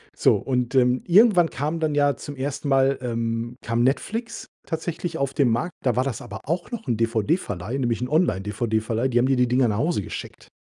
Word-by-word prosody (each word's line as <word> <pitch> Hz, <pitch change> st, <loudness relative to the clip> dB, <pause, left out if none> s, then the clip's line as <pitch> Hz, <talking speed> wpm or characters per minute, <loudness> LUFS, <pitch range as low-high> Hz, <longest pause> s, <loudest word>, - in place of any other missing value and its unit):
So, -, -, +4 dB
und, 125 Hz, 0 st, -1 dB
ähm, 125 Hz, -1 st, +3 dB
irgendwann 180 Hz, -2 st, +5 dB
kam 150 Hz, +5 st, -3 dB
dann 155 Hz, -2 st, 0 dB
ja 145 Hz, -1 st, +3 dB
zum 145 Hz, +4 st, -8 dB
1. 140 Hz, +2 st, -4 dB
Mal, 135 Hz, 0 st, +3 dB
ähm 115 Hz, -1 st, -2 dB
kam 115 Hz, +1 st, 0 dB
Netflix 225 Hz, -, -2 dB, 0.2 s
tatsächlich 165 Hz, +1 st, -4 dB
auf 140 Hz, -2 st, -1 dB
den 135 Hz, -4 st, +3 dB
Markt. 140 Hz, +10 st, -1 dB
Da 125 Hz, -4 st, +1 dB
war 125 Hz, -, +2 dB
das 130 Hz, -6 st, -4 dB
aber 100 Hz, +1 st, -8 dB
auch 170 Hz, +4 st, -2 dB
noch 235 Hz, -10 st, -6 dB
'n 120 Hz, -, +1 dB
DVD-Verleih, 115 Hz, -, -1 dB
nämlich 120 Hz, -3 st, -1 dB
'n 125 Hz, -, -1 dB
Online-DVD-Verleih. 110 Hz, -, 0 dB
Die 120 Hz, -, 0 dB
haben 120 Hz, -, +4 dB
dir 135 Hz, 0 st, +2 dB
die 125 Hz, 0 st, +3 dB
Dinger 125 Hz, +1 st, +3 dB
nach 105 Hz, -2 st, -1 dB
Hause 150 Hz, -, 0 dB
geschickt. -, -, -8 dB
130 Hz, 205 wpm, -24 LUFS, 115-155 Hz, 0.2 s, irgendwann